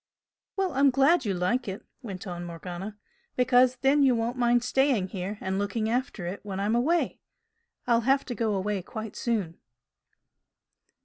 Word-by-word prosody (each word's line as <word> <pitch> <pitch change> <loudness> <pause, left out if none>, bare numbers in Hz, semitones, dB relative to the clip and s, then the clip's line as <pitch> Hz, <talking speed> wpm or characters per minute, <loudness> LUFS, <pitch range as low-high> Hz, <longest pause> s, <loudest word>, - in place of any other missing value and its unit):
"Well, 385 -2 0
I'm 275 +1 +5
glad 275 +3 +3
you 200 -3 0
like 185 +8 0
it" 195 0 -6 0.2
went 195 -7 -7
on 175 -2 -5
Morgana 175 +4 -7 0.4
"Because 250 0 +4
then 275 +2 +4
you 265 -3 +5
won't 230 +2 -1
mind 240 -1 +3
staying 250 -6 +2
here 195 +1 -4
and 190 +1 -2
looking 215 +2 -1
after 245 -7 -2
it 185 +3 -4
when 195 -2 -5
I'm 205 +3 0
away. 305 +9 +1 0.7
I'll 235 -1 +3
have 270 +3 +2
to 250 - -4
go 225 -3 0
away 195 0 -1
quite 215 +4 -7
soon." 205 -9 -2
230 Hz, 165 wpm, -27 LUFS, 195-255 Hz, 0.7 s, I'm